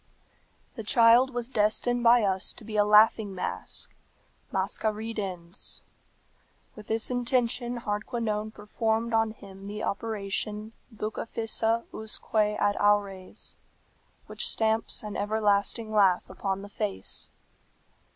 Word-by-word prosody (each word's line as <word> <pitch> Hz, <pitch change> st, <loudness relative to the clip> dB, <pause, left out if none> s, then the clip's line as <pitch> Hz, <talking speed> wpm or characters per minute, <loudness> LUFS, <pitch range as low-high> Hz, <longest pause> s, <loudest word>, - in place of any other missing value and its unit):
"The 225 Hz, -, -4 dB
child 235 Hz, +4 st, +5 dB
was 240 Hz, -2 st, -3 dB
destined 240 Hz, +1 st, +1 dB
by 235 Hz, 0 st, +6 dB
us 190 Hz, -2 st, +1 dB
to -, -, -14 dB
be 215 Hz, 0 st, -7 dB
a 210 Hz, -, +5 dB
laughing 210 Hz, -1 st, +5 dB
mask 180 Hz, -, -3 dB, 0.6 s
(masca 220 Hz, -, 0 dB
ridens). 200 Hz, -5 st, -4 dB, 0.9 s
"With 210 Hz, -1 st, -11 dB
this 225 Hz, +2 st, +1 dB
intention 245 Hz, -1 st, 0 dB
Hardquanonne 215 Hz, 0 st, -2 dB
performed 220 Hz, +2 st, -1 dB
on 225 Hz, 0 st, +3 dB
him 195 Hz, -2 st, -11 dB
the 210 Hz, +1 st, -5 dB
operation, 210 Hz, 0 st, -3 dB, 0.2 s
Bucca 220 Hz, +1 st, -4 dB
fissa 225 Hz, 0 st, 0 dB
usque 220 Hz, 0 st, -5 dB
ad 210 Hz, -1 st, +2 dB
aures, 200 Hz, -2 st, +1 dB, 0.7 s
which -, -, -1 dB
stamps 220 Hz, 0 st, 0 dB
an 210 Hz, -1 st, -6 dB
everlasting 210 Hz, +1 st, +1 dB
laugh 195 Hz, -4 st, +4 dB
upon 195 Hz, 0 st, -3 dB
the 205 Hz, -, -9 dB
face. 95 Hz, -, -3 dB
215 Hz, 115 wpm, -28 LUFS, 205-225 Hz, 0.9 s, by